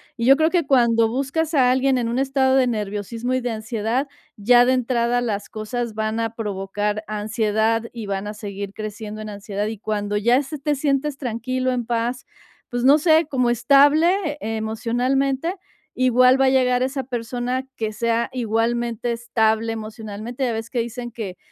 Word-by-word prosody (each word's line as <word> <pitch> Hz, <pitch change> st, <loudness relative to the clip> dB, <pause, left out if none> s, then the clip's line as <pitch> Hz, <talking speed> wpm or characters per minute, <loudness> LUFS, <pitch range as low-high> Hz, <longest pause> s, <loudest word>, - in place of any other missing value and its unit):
Y 235 Hz, -3 st, -2 dB
yo 270 Hz, +2 st, +7 dB
creo 315 Hz, +1 st, +3 dB
que 345 Hz, -3 st, +1 dB
cuando 235 Hz, -4 st, +3 dB
buscas 280 Hz, +6 st, -1 dB
a 255 Hz, -4 st, +4 dB
alguien 260 Hz, 0 st, +2 dB
en 235 Hz, -2 st, -1 dB
un 240 Hz, +3 st, -1 dB
estado 270 Hz, -1 st, +2 dB
de 260 Hz, -1 st, +4 dB
nerviosismo 220 Hz, +2 st, -3 dB
y 255 Hz, -, +1 dB
de 245 Hz, -, -2 dB
ansiedad, 225 Hz, +4 st, -2 dB, 0.3 s
ya 240 Hz, +4 st, +5 dB
de 255 Hz, -, +3 dB
entrada 245 Hz, -1 st, +1 dB
las 215 Hz, -4 st, -3 dB
cosas 225 Hz, +1 st, -4 dB
van 220 Hz, +1 st, -2 dB
a 225 Hz, 0 st, -3 dB
provocar 205 Hz, 0 st, -3 dB
ansiedad 220 Hz, +1 st, 0 dB
y 230 Hz, -3 st, -7 dB
van 195 Hz, 0 st, -3 dB
a 210 Hz, -, -4 dB
seguir 200 Hz, -2 st, -6 dB
creciendo 215 Hz, 0 st, -6 dB
en 215 Hz, -, -6 dB
ansiedad, 205 Hz, 0 st, -4 dB
y 220 Hz, 0 st, -4 dB
cuando 205 Hz, 0 st, -3 dB
ya 235 Hz, +6 st, +3 dB
se 295 Hz, +2 st, -6 dB
te 295 Hz, +2 st, -1 dB
sientes 275 Hz, 0 st, 0 dB
tranquilo, 255 Hz, 0 st, -2 dB
en 245 Hz, -2 st, -2 dB
paz, 240 Hz, +1 st, -2 dB, 0.4 s
pues 245 Hz, +1 st, -2 dB
no 285 Hz, +3 st, +7 dB
sé, 320 Hz, +1 st, +4 dB
como 250 Hz, -3 st, +1 dB
estable 295 Hz, -, +4 dB
emocionalmente, 245 Hz, +7 st, -1 dB, 0.4 s
igual 255 Hz, +1 st, +4 dB
va 270 Hz, -, +4 dB
a -, -, +5 dB
llegar 250 Hz, -1 st, +2 dB
esa 265 Hz, +1 st, -1 dB
persona 245 Hz, +1 st, -3 dB
que 220 Hz, -1 st, -2 dB
sea 230 Hz, +2 st, 0 dB
igualmente 235 Hz, 0 st, -1 dB
estable 225 Hz, -1 st, 0 dB
emocionalmente, 220 Hz, +3 st, -5 dB
ya 235 Hz, -, -1 dB
ves 225 Hz, 0 st, -5 dB
que 245 Hz, -, -2 dB
dicen 240 Hz, +1 st, -4 dB
que: 195 Hz, -6 st, -6 dB
235 Hz, 175 wpm, -22 LUFS, 220-260 Hz, 0.4 s, yo